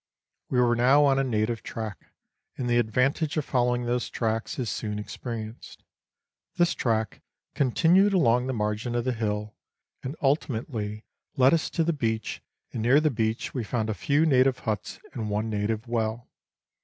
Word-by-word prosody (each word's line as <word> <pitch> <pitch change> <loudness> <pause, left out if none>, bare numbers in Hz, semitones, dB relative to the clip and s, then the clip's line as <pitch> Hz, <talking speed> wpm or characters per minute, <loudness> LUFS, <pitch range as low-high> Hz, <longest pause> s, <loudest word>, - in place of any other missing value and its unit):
We 125 - +1
were 120 -1 +4
now 135 +5 +5
on 135 -1 +3
a - - +2
native 115 -2 0
track, 110 -3 -7 0.5
and 125 - -2
the 120 0 +3
advantage 130 +8 +1
of 150 - 0
following 125 -1 +1
those 120 +1 -1
tracks 115 -1 -2
is 125 - -2
soon 105 -1 -3
experienced. 110 +2 -7 0.7
This 175 0 +3
track 110 -3 -1 0.3
continued 170 - +4
along 125 -9 +3
the 130 - -1
margin 105 +2 -2
of 120 - 0
the 130 - +1
hill, 105 -2 -2 0.5
and 135 +3 -5
ultimately 115 -7 -1 0.3
led 130 +2 +6
us 165 - +1
to 165 - 0
the 170 +1 +1
beach, 115 -6 -2 0.3
and 115 - -3
near 125 +6 +5
the 155 -1 +2
beach 110 -1 -1
we 125 - -2
found 110 0 -1
a - - -1
few 145 - +2
native 130 -3 +4
huts 110 -3 -3
and 110 -2 -4
one 105 +2 -1
native 105 +2 -2
well. 115 0 -2
120 Hz, 165 wpm, -27 LUFS, 110-135 Hz, 0.7 s, led